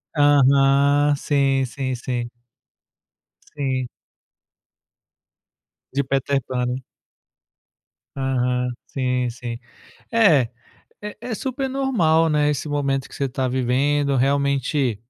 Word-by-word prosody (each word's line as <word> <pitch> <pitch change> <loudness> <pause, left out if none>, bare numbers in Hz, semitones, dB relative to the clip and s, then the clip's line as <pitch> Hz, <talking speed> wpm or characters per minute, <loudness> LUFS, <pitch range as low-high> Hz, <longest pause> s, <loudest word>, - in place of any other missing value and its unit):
Aham. 140 0 +4
Sim, 135 -2 +1
sim, 130 +1 -4
sim. 120 -1 -4 1.3
Sim. 130 -3 -1 2.1
De 140 +1 +1
Peter 135 +1 0
Pan, 125 -1 -1
né? 125 - -1 1.4
Aham, 125 -1 0 0.2
sim, 125 -2 -1
sim. 120 0 -6 0.5
É, 165 - +4 0.5
e 210 0 -6
é 240 -1 -4
super 265 +3 -3
normal, 175 -13 +2
né, 150 -1 +2
esse 150 +1 -2
momento 140 -2 -1
que - - -12
você 140 - -1
tá 130 0 -2
vivendo, 135 +3 +1
realmente 140 -2 +1
140 Hz, 100 wpm, -22 LUFS, 130-145 Hz, 2.1 s, Aham